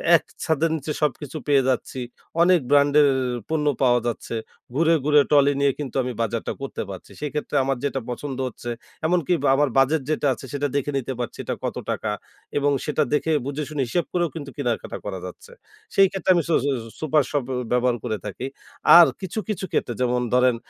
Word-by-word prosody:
এক -, -, +3 dB, 0.2 s
ছাদের 160 Hz, 0 st, +1 dB
নিচে 150 Hz, 0 st, -4 dB
সবকিছু 150 Hz, +1 st, -1 dB
পেয়ে 140 Hz, -2 st, +5 dB
যাচ্ছি। 130 Hz, +1 st, -2 dB, 0.4 s
অনেক 180 Hz, +1 st, +6 dB
ব্র্যান্ডের 145 Hz, +1 st, +5 dB, 0.4 s
পণ্য 155 Hz, -2 st, 0 dB, 0.2 s
পাওয়া 120 Hz, -2 st, +4 dB
যাচ্ছে। 120 Hz, 0 st, -4 dB, 0.4 s
ঘুরে, 165 Hz, +3 st, +4 dB
ঘুরে 150 Hz, -1 st, +6 dB
ট্রলি 145 Hz, -1 st, +5 dB
নিয়ে 140 Hz, -1 st, +4 dB
কিন্তু 145 Hz, -3 st, -5 dB
আমি 125 Hz, -, -3 dB
বাজারটা 115 Hz, 0 st, -2 dB
করতে 135 Hz, -, -4 dB
পারছি। 95 Hz, -2 st, -9 dB
সেক্ষেত্রে 150 Hz, 0 st, -3 dB
আমার 135 Hz, 0 st, 0 dB
যেটা 140 Hz, -1 st, -1 dB
পছন্দ 130 Hz, +2 st, -4 dB
হচ্ছে, 120 Hz, 0 st, -7 dB, 0.4 s
এমনকি 175 Hz, -1 st, +1 dB, 0.2 s
আমার 145 Hz, 0 st, +2 dB
বাজেট 135 Hz, +4 st, +4 dB
যেটা 155 Hz, -2 st, +1 dB
আছে, 130 Hz, -, -10 dB
সেটা 145 Hz, 0 st, 0 dB
দেখে 140 Hz, +1 st, 0 dB
নিতে 130 Hz, 0 st, -3 dB
পারছি, 120 Hz, -, -4 dB
এটা -, -, -2 dB
কত -, -, -3 dB
টাকা। -, -, -3 dB, 0.6 s
এবং 145 Hz, 0 st, +2 dB
সেটা 150 Hz, 0 st, +1 dB
দেখে, 150 Hz, +2 st, +1 dB
বুঝে, 145 Hz, +2 st, -3 dB
শুনে 150 Hz, -2 st, -2 dB
হিসেব 170 Hz, +8 st, 0 dB
করেও 175 Hz, -2 st, +1 dB
কিন্তু 145 Hz, -3 st, -6 dB
কেনাকাটা 125 Hz, -5 st, -2 dB
করা 95 Hz, -3 st, -4 dB
যাচ্ছে। 90 Hz, -, -10 dB, 0.4 s
সেই 195 Hz, 0 st, +7 dB
ক্ষেত্রে 195 Hz, -1 st, -3 dB
আমি 170 Hz, -, +2 dB
স -, -, +1 dB
স -, -, 0 dB, 0.3 s
সুপার 155 Hz, -1 st, +2 dB
শপ 145 Hz, -3 st, 0 dB, 0.3 s
ব্যবহার 125 Hz, 0 st, +2 dB
করে 110 Hz, -, -2 dB
থাকি। 105 Hz, +5 st, -5 dB, 0.5 s
আর 170 Hz, -, +9 dB
কিছু, 190 Hz, +3 st, -3 dB
কিছু 210 Hz, -2 st, -2 dB
ক্ষেত্রে, 120 Hz, -, 0 dB
যেমন 125 Hz, 0 st, +1 dB
ধরেন 125 Hz, -1 st, +4 dB
145 Hz, 185 wpm, -23 LUFS, 125-155 Hz, 0.6 s, আর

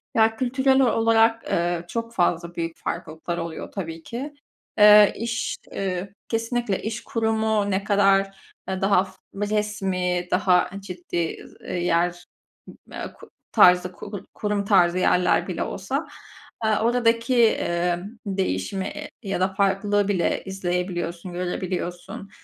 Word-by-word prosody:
Ya 225 Hz, 0 st, +4 dB
kültürel 265 Hz, +2 st, +2 dB
ol 245 Hz, -, +3 dB
olarak, 225 Hz, 0 st, +3 dB
ııı, 170 Hz, 0 st, 0 dB
çok 230 Hz, +3 st, -4 dB
fazla 175 Hz, -3 st, 0 dB
büyük 165 Hz, -1 st, -4 dB
farklılıklar 170 Hz, 0 st, -5 dB
oluyor 165 Hz, -1 st, -5 dB
tabii 165 Hz, -4 st, -6 dB
ki. 270 Hz, -, -6 dB, 0.4 s
Eee, 210 Hz, -1 st, +8 dB
iş, 230 Hz, +2 st, -2 dB, 0.2 s
eee, 190 Hz, 0 st, -3 dB, 0.2 s
kesinlikle 230 Hz, -3 st, -1 dB
iş 220 Hz, +1 st, -4 dB
kurumu 220 Hz, -2 st, 0 dB
ne 190 Hz, +1 st, 0 dB
kadar, 195 Hz, -1 st, +3 dB, 0.3 s
ııı, 190 Hz, 0 st, -3 dB
daha 195 Hz, -1 st, +3 dB, 0.3 s
resmi 195 Hz, -4 st, -1 dB
daha 180 Hz, -1 st, +3 dB
ciddi, 175 Hz, -3 st, -4 dB, 0.2 s
ııı, -, -, -8 dB
yer, 175 Hz, 0 st, 0 dB, 0.7 s
ııı, -, -, -6 dB
k -, -, -15 dB, 0.2 s
tarzı 180 Hz, 0 st, +5 dB
kur 200 Hz, +2 st, -8 dB
kurum 205 Hz, -1 st, -2 dB
tarzı 180 Hz, -3 st, +4 dB
yerler 180 Hz, -1 st, +2 dB
bile -, -, -2 dB
olsa, -, -, -3 dB, 0.6 s
ııı, 220 Hz, -1 st, +2 dB
oradaki, 230 Hz, 0 st, +3 dB
ımm, 175 Hz, +5 st, -2 dB
değişimi, 190 Hz, -, -2 dB
eee, -, -, -7 dB
ya 195 Hz, -3 st, -2 dB
da 185 Hz, -, +3 dB
farklılığı 200 Hz, +1 st, +1 dB
bile 185 Hz, -4 st, 0 dB
izleyebiliyorsun, 180 Hz, -2 st, -3 dB
görebiliyorsun. 180 Hz, +3 st, -4 dB
195 Hz, 125 wpm, -24 LUFS, 175-220 Hz, 0.7 s, Eee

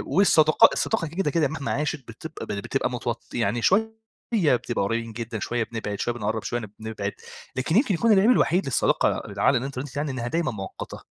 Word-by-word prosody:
والصداقا 175 Hz, +1 st, +6 dB
الصداقة 220 Hz, -7 st, 0 dB
دي 155 Hz, -, -11 dB
كده 175 Hz, -6 st, 0 dB
كده 160 Hz, -2 st, +2 dB
مهما 140 Hz, -1 st, -4 dB
عاشت 150 Hz, -2 st, -2 dB
بتبقى 155 Hz, +8 st, -8 dB
بتبقى 105 Hz, +6 st, -2 dB
متو 120 Hz, -1 st, -2 dB, 0.2 s
يعني 115 Hz, 0 st, 0 dB
شوية 220 Hz, -, +3 dB, 0.4 s
بتبقى 125 Hz, -, +2 dB
قريبين 115 Hz, +2 st, -2 dB
جدًا 115 Hz, -1 st, -5 dB
شوية 120 Hz, +3 st, -1 dB
بنبعد 110 Hz, -3 st, -5 dB
شوية 120 Hz, -, -1 dB
بنقرّب 110 Hz, -1 st, -2 dB
شوية 120 Hz, 0 st, -2 dB, 0.2 s
بنبعد، 110 Hz, -2 st, -4 dB, 0.4 s
لكن 130 Hz, +6 st, 0 dB
يمكن 240 Hz, -4 st, +3 dB
يكون 230 Hz, +7 st, +2 dB
العيب 200 Hz, +3 st, +5 dB
الوحيد 190 Hz, -6 st, +3 dB
للصداقة 135 Hz, -, +2 dB
اللي 100 Hz, -1 st, -6 dB
على 135 Hz, -, +4 dB
الانترنت 135 Hz, +1 st, -5 dB
يعني 145 Hz, 0 st, -1 dB
إنّها 120 Hz, -2 st, -3 dB
دايمًا 165 Hz, +1 st, 0 dB
مؤقّتة. 95 Hz, -4 st, -7 dB
130 Hz, 180 wpm, -25 LUFS, 115-160 Hz, 0.4 s, والصداقا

